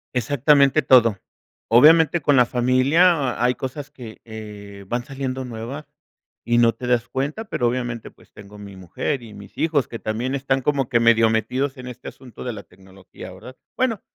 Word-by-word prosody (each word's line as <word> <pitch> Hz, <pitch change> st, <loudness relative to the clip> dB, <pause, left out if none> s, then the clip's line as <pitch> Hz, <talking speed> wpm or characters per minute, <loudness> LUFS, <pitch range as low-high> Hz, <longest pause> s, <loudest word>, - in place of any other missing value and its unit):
Exactamente 140 Hz, +3 st, +3 dB
todo. 120 Hz, -6 st, +4 dB, 0.5 s
Obviamente, 160 Hz, +7 st, +5 dB
con 145 Hz, 0 st, +2 dB
la 125 Hz, -2 st, +5 dB
familia 130 Hz, +9 st, +3 dB, 0.3 s
ha 120 Hz, -, +2 dB
hay 125 Hz, 0 st, +2 dB
cosas 140 Hz, +2 st, -7 dB
que, 120 Hz, -6 st, -11 dB
eh, 105 Hz, -3 st, -10 dB
van 120 Hz, +3 st, -3 dB
saliendo 130 Hz, -2 st, -5 dB
nuevas 125 Hz, +5 st, -7 dB, 0.6 s
y 120 Hz, 0 st, +1 dB
no 115 Hz, -1 st, +4 dB
te 125 Hz, -, -8 dB
das 120 Hz, -1 st, +1 dB
cuenta. 145 Hz, +12 st, -3 dB
Pero, 130 Hz, -, -1 dB
obviamente, 120 Hz, -1 st, -4 dB
pues -, -, -24 dB
tengo 105 Hz, +1 st, -14 dB
mi 100 Hz, -1 st, -11 dB
mujer 105 Hz, -, -4 dB
y 110 Hz, -2 st, -12 dB
mis 100 Hz, 0 st, -14 dB
hijos 155 Hz, -5 st, 0 dB
que 115 Hz, -, -8 dB
también 120 Hz, +5 st, -3 dB
están 135 Hz, 0 st, -1 dB
como 135 Hz, -1 st, -1 dB
que 120 Hz, -, +2 dB
medio 115 Hz, -1 st, +4 dB
metidos 130 Hz, +5 st, -1 dB
en 125 Hz, 0 st, -9 dB
este 125 Hz, 0 st, -8 dB
asunto 130 Hz, -3 st, -13 dB
de 125 Hz, -, -4 dB
la 100 Hz, -2 st, -9 dB
tecnología, 95 Hz, 0 st, -14 dB
¿verdad? 130 Hz, -, -12 dB, 0.2 s
Bueno, 235 Hz, -5 st, 0 dB
125 Hz, 180 wpm, -21 LUFS, 115-140 Hz, 0.6 s, Obviamente